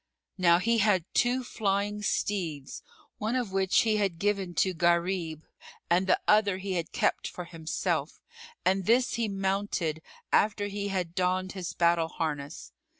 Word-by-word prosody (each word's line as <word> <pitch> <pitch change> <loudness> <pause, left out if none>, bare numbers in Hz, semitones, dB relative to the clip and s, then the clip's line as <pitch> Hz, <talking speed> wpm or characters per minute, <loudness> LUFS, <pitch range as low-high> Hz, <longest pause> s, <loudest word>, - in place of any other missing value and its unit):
Now 170 -2 +5
he 230 +5 +1
had 200 -5 +3
two 250 +2 +2
flying 205 -2 -1
steeds, 170 -9 -2 0.4
one 220 +3 -1
of 245 -6 -1
which 190 0 +3
he 220 -2 +2
had 195 -5 0
given 195 -2 -1
to 190 - +2
Gharib 170 -2 0 0.5
and 180 +2 +3
the - - +3
other 210 -3 +4
he 190 0 -4
had 170 -2 -3
kept - - 0
for 180 - -7
himself; 165 -2 -3 0.5
and 190 0 +1
this 245 +2 +3
he 230 -1 0
mounted 195 -5 -1 0.3
after 205 0 +3
he 200 0 -3
had 185 -4 -2
donned 185 +1 0
his 185 -3 -5
battle 170 -1 +2
harness. 150 -3 -4
190 Hz, 150 wpm, -28 LUFS, 170-205 Hz, 0.5 s, Now